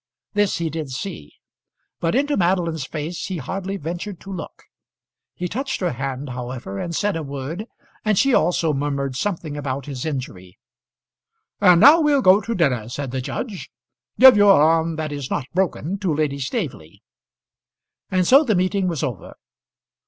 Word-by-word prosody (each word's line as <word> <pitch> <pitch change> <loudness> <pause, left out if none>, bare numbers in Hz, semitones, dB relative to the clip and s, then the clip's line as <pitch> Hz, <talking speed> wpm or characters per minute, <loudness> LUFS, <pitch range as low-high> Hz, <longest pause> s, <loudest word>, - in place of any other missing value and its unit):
This 205 -1 +1
he 165 -2 -2
did 155 -2 -4
see, 130 - -7 0.6
but 165 +4 0
into 285 +2 +1
Madeline's 170 -5 0
face 160 +2 -5
he 185 - -4
hardly 195 +7 -4
ventured 175 +3 -5
to 195 - -8
look. 175 - -8 0.7
He 180 - -3
touched 265 +8 -3
her 180 -2 0
hand, 135 +2 -4
however, 120 -5 -6
and 170 - -4
said 205 0 0
a 165 - -2
word; 145 - -6 0.4
and 215 -2 +1
she 275 +4 +3
also 165 -3 +2
murmured 140 -1 -2
something 165 -2 -3
about 140 -2 -4
his 135 -4 -6
injury. 125 - -6 1.0
"And 180 -4 +6
now 305 +7 +8
we'll 290 -3 +3
go 190 +3 +6
to 230 +1 -3
dinner," 125 -10 0
said 135 +1 -5
the 130 0 -2
judge. 205 - -5 0.5
"Give 260 -2 +9
your 205 -4 +6
arm 165 +2 +3
that 155 -1 -4
is 145 -3 -5
not 140 - -2
broken 185 0 -1
to 190 -4 -1
Lady 145 -2 -1
Staveley." 135 - -5 1.1
And 185 -1 +1
so 275 - +6
the 225 -8 +1
meeting 185 +1 +1
was 165 -6 -2
over. 120 -7 -5
165 Hz, 165 wpm, -22 LUFS, 140-195 Hz, 1.1 s, Give